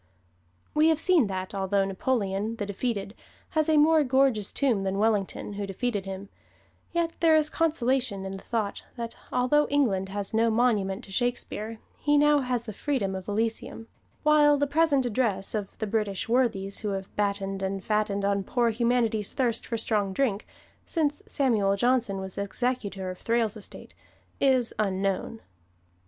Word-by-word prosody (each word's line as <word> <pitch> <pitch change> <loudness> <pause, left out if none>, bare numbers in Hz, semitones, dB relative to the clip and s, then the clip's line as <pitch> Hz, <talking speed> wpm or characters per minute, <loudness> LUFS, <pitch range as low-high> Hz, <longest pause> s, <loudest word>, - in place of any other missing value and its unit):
We 305 +1 +4
have 320 -1 +4
seen 325 - +3
that, 190 0 -4
although 195 0 +1
Napoleon, 200 +1 -1
the 210 - -3
defeated, 200 0 -3 0.4
has 310 -1 +1
a 310 - +4
more 310 +1 +5
gorgeous 260 -6 +2
tomb 250 -8 +1
than 195 0 -1
Wellington, 210 -1 0
who 200 0 -4
defeated 205 0 -2
him, 195 +1 -6 0.6
yet 340 -1 0
there 325 -2 +5
is 305 -1 +2
consolation 260 -10 0
in 190 - -4
the 195 - -5
thought 220 -4 -3
that 235 -2 -5 0.2
although 255 +4 +3
England 210 -10 +1
has 200 +1 -4
no 225 +1 +3
monument 220 -3 +1
to 195 - -12
Shakespeare 230 -1 -1 0.2
he 295 0 +3
now 295 0 +5
has 250 -3 -1
the 215 - -6
freedom 220 -5 -1
of 190 -1 -6
Elysium; 225 +1 -2 0.4
while 300 -1 +5
the 285 - +2
present 285 -2 +2
address 210 -5 0
of 210 -3 -4
the 220 - -2
British 205 -2 -1
worthies 225 -5 +1
who 215 - -4
have 195 0 -6
battened 200 -1 -1
and 195 0 -2
fattened 210 -2 0
on 200 0 +1
poor 235 +3 +1
humanity's 230 -2 +1
thirst 235 -4 -1
for 230 - -2
strong 210 -3 0
drink, 220 -4 0 0.4
since 300 -3 0
Samuel 215 -8 +2
Johnson 240 -2 +1
was 190 0 -6
executor 200 -3 -2
of 185 - -10
Thrale's 230 -2 0
estate, 215 - -8 0.5
is 260 -4 +2
unknown. 195 +2 -1
225 Hz, 160 wpm, -27 LUFS, 195-260 Hz, 0.6 s, more